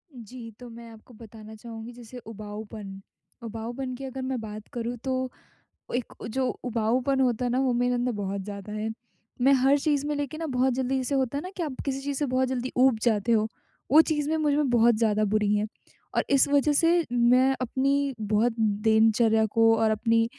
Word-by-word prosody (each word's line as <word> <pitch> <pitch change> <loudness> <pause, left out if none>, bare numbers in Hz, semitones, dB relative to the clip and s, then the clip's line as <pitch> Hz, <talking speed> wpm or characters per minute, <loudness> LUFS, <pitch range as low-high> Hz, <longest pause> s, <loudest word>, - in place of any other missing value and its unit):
जी, 235 0 -10
तो 245 - -10
मैं 230 0 -11
आपको 225 +2 -16
बताना 220 -1 -12
चाहूँगी 225 +1 -9
जैसे 240 0 -11
उबाऊपन 210 -2 -8 0.4
उबाऊपन 235 +4 -5
की 270 - -9
अगर 265 0 -6
मैं 260 -1 -2
बात 215 -1 -8
करूँ 240 0 -3
तो 260 -1 -1 0.7
एक 245 -1 -2 0.2
जो 260 +2 0 0.2
उबाऊपन 245 +3 0
होता 250 -2 +1
है 245 - 0
ना, 250 - +1
वो 260 -2 +2
मेरे 245 +1 +1
अंदर 245 0 0
बहुत 200 -2 -3
ज़्यादा 200 +1 -8
है। 215 +1 -3 0.5
मैं 270 +3 +5
हर 270 +2 +4
चीज़ 290 -1 0
में 300 - -1
लेके 285 +1 -3
ना 325 - -3
बहुत 260 -2 +1
जल्दी 260 +1 -1
जैसे 260 +2 -1
होता 265 0 0
है - - -4
ना, 370 - -7
कि 360 - -2
आप 300 -5 -3
किसी 275 -1 -2
चीज़ 280 0 -3
से 295 - 0
बहुत 255 0 +1
जल्दी 255 0 -3
ऊब 255 -2 +4
जाते 230 -1 +2
हो 220 -1 +2 0.4
वो 300 +4 +8
चीज़ 295 -2 0
में 320 - +1
मुझ 300 -2 +1
में 295 -1 +1
बहुत 235 0 +5
ज़्यादा 215 -2 +2
बुरी 210 0 +1
हैं। 210 0 +1 0.5
और - - +1
इस 275 -1 +5
वज़ह 285 +1 +3
से 335 +3 +3
मैं 250 +2 +4
अपनी 275 +2 0
बहुत 215 +3 +1
दिनचर्या 220 +1 +3
को 225 +1 +4
और 220 0 +2
अपनी 225 +1 +2
245 Hz, 205 wpm, -26 LUFS, 220-265 Hz, 0.7 s, वो